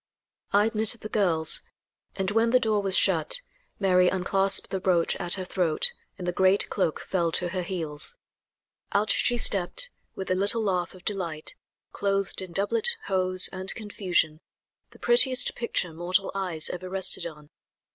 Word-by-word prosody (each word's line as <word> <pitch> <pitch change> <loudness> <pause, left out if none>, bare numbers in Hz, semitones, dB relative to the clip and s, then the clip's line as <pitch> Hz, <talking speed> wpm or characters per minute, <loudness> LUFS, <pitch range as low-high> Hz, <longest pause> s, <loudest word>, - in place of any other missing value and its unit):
I 205 +1 +4
admitted 220 +1 +1
the 215 - -7
girls, 170 -7 +1 0.5
and 190 0 -2
when 225 +2 +2
the 255 +2 +4
door 215 -3 +1
was 195 -1 +4
shut - - +2 0.4
Mary 180 -2 +4
unclasped 195 +1 +2
the 190 - -2
brooch 180 -3 +1
at 175 -2 0
her 185 -2 -5
throat 180 - 0 0.2
and 180 - -7
the - - +1
great 190 +2 +2
cloak 185 -6 -1
fell 170 -3 -1
to 175 - +2
her 185 +1 -3
heels. 170 - -1 0.8
Out 210 +2 +2
she 245 - +2
stepped, 205 - 0 0.2
with 190 -1 -5
a - - +4
little 200 +4 +1
laugh 180 -3 -1
of 185 - -16
delight, 170 -7 -3 0.4
clothed 195 -1 0
in 185 -2 -8
doublet, 445 - +2
hose 185 -1 +3
and 190 +1 -2
confusion, 180 -7 -1 0.5
the - - -18
prettiest 270 - +2
picture 180 -8 -2
mortal 180 +4 -1
eyes 180 -5 -2
ever 185 +1 -7
rested 190 -2 +1
on. 150 -2 -13
190 Hz, 160 wpm, -26 LUFS, 175-205 Hz, 0.8 s, I